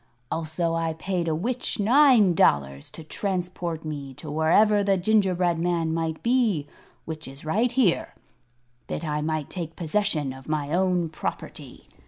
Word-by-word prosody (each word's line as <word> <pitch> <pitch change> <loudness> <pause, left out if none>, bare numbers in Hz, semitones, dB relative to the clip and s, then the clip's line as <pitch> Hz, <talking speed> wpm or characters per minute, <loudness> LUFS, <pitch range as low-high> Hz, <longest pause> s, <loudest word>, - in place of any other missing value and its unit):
Also 165 +1 -1
I 165 -1 -1
paid 175 +1 -2
a 160 - +1
witch 235 +7 -1
nine 235 -3 +5
dollars 70 - +2
to 160 - -10
transport 175 -2 -3
me 140 -3 -6
to 150 +2 -8
wherever 205 +7 +4
the 195 -1 +2
gingerbread 185 -4 +2
man 170 -2 0
might 160 -1 -2
be 230 - +2 0.4
which 160 -2 -6
is 135 +3 -11
right 220 +10 +1
here 240 -9 +1 0.7
that 165 - -4
I 150 -1 -1
might 155 -1 -2
take 165 -3 -5
possession 165 -5 0
of 135 +2 -12
my 150 -1 -1
own 180 -1 +2
property. 155 - -6
165 Hz, 150 wpm, -25 LUFS, 155-195 Hz, 0.7 s, nine